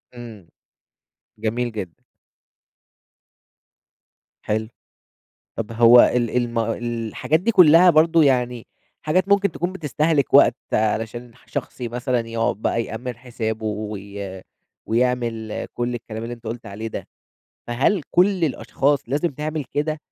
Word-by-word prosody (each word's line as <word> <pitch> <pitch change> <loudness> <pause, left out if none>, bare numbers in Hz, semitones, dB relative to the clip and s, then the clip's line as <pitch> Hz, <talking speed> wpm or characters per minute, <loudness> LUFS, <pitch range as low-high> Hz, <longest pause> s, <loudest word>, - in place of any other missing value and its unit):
إمم، 110 -7 -11 0.9
جميل 115 +2 -2
جدًا. 95 -6 -7 2.4
حلو، 110 +1 -1 0.9
طب 115 0 -4
هو 120 +1 +7
ال 120 -2 +3
الم 120 -1 0
الحاجات 115 +6 -1
دي 230 - +1
كلّها 180 -3 +7
برضو 165 0 +4
يعني 125 -4 +1 0.4
حاجات 185 +5 +2
ممكن 200 0 +3
تكون 175 +2 -3
بتستهلك 150 -3 0
وقت - - +7 0.2
علشان 110 +2 -1
ح - - -24
شخص - - -5
مثلًا 125 +1 -1
يقعد 115 -2 -1
بقى 115 +2 -1
يأمن 120 +1 -6
حسابُه 110 -3 -4
وي 100 -2 -6 0.4
ويعمل 115 -2 -1
كُلّ 120 0 -2
الكلام 110 -1 -6
اللي 120 +1 -5
أنت 115 - -20
قلت 115 +1 -6
عليه 105 +3 -6
ده، - - -7 0.6
فهل 135 - +1
كُلّ 185 -1 +3
الأشخاص 145 -1 0
لازم 145 +6 0
تعمل 150 +1 -4
كده، 150 +3 -2
120 Hz, 120 wpm, -22 LUFS, 110-150 Hz, 2.4 s, هو